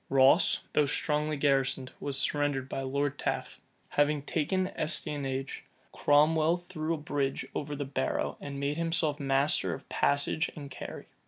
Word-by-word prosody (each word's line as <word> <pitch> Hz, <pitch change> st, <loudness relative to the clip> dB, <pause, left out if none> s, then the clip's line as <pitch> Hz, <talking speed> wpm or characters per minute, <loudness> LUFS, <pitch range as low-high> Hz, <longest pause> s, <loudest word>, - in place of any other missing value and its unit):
Ross, 135 Hz, +6 st, +5 dB
though 150 Hz, -1 st, +3 dB
strongly 150 Hz, +1 st, 0 dB
garrisoned, 135 Hz, -2 st, +1 dB
was 140 Hz, -2 st, -3 dB
surrendered 145 Hz, -2 st, 0 dB
by 135 Hz, -, -3 dB
Lord 140 Hz, +1 st, -1 dB
Taffe. -, -, -3 dB, 0.3 s
Having 145 Hz, 0 st, +2 dB
taken 185 Hz, +5 st, 0 dB
Estionage, 140 Hz, -6 st, -2 dB, 0.3 s
Cromwell 155 Hz, +3 st, +4 dB
threw 175 Hz, -3 st, -4 dB
a -, -, -5 dB
bridge 145 Hz, -2 st, -2 dB
over 145 Hz, 0 st, -3 dB
the 145 Hz, 0 st, -3 dB
Barrow, 135 Hz, -1 st, -1 dB
and 140 Hz, -1 st, -5 dB
made 140 Hz, +2 st, -1 dB
himself 165 Hz, -3 st, +1 dB
master 140 Hz, +1 st, +1 dB
of -, -, -13 dB
Passage 145 Hz, +3 st, +1 dB
and 140 Hz, -2 st, -8 dB
Carrie. -, -, -7 dB
145 Hz, 145 wpm, -30 LUFS, 135-155 Hz, 0.3 s, Ross